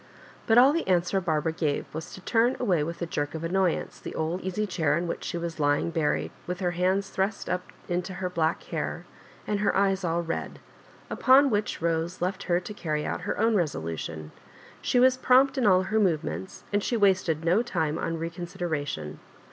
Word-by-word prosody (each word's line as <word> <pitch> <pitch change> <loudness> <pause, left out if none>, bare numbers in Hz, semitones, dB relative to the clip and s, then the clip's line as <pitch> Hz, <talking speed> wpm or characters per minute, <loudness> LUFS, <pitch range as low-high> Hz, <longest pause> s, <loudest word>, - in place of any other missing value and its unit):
But 225 - +5
all 260 +4 +7
the 335 - -1
answer 180 +1 +2
Barbara 160 -2 0
gave 155 -3 -1
was 160 +3 -6
to 190 - -11
turn 235 +5 +2
away 180 -11 +2
with 170 +2 -4
a - - 0
jerk 145 -2 -3
of 160 - -5
annoyance 180 0 0
the - - -7
old 165 +4 -2
eaefy 190 +3 -2
chair 160 -5 +1
in 175 +1 -2
which - - -4
she - - -3
was 170 -1 -5
lying 145 +3 +2
buried, 160 -3 0 0.2
with 180 +1 -3
her 180 -2 0
hands 185 +3 0
thrust 195 +2 -1
up 180 0 -3 0.2
into 180 +1 -2
her 185 0 -2
black 165 -2 0
hair, - - -4 0.4
and 205 -1 -1
her 205 - +1
eyes 195 -1 +2
all 170 0 0
red; 165 0 -4 0.5
upon 270 +1 +5
which 210 0 -1
Bose 165 +1 -1
left 185 +2 -2
her 175 0 +3
to 185 +4 -8
carry 155 -6 -2
out - - -3
her 180 - -3
own 225 +1 +3
resolution. 80 - -2 0.5
She 250 - +2
was 255 +1 +5
prompt 260 +2 +4
in 255 -5 +2
all 185 -1 +5
her 220 +3 0
movements, 185 0 -1
and 205 0 +2
she 240 - 0
wasted 185 -6 +2
no 180 +6 +4
time 160 -10 -1
on 165 - -2
recon 170 +2 -5
sideration. 150 - -4
180 Hz, 200 wpm, -27 LUFS, 165-200 Hz, 0.5 s, all